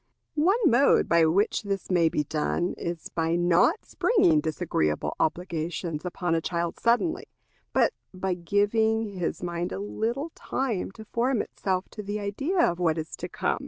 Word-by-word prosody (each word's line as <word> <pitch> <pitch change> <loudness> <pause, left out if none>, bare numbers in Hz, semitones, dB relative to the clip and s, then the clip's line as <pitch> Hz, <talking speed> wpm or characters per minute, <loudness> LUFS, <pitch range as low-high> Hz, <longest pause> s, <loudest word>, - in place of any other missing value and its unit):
One 380 +7 +4
mode 275 -2 +5
by 170 -1 +4
which 195 +6 +2
this 195 -2 -3
may 170 -3 +4
be 150 - 0
done 160 +4 -1
is 170 -1 -5
by 165 0 0
not 175 - +3
springing 380 -9 +3
disagreeable 75 - -1
obligations 165 -1 -2
upon 180 -1 -1
a 165 - +1
child 170 0 -2
suddenly, 245 +9 +1 0.5
but - - +3 0.2
by 190 0 -2
giving 210 +5 +1
his 175 - -2
mind 175 0 -3
a - - -3
little 230 +9 -3
time 245 -8 -2
to 220 0 -11
form 240 +2 0
itself 185 -1 -2
to 210 - -7
the 205 +1 -4
idea 275 - 0
of 175 0 -1
what 165 -2 +2
is 160 0 -5
to - - -6
come. - - -1
185 Hz, 160 wpm, -27 LUFS, 170-225 Hz, 0.5 s, mode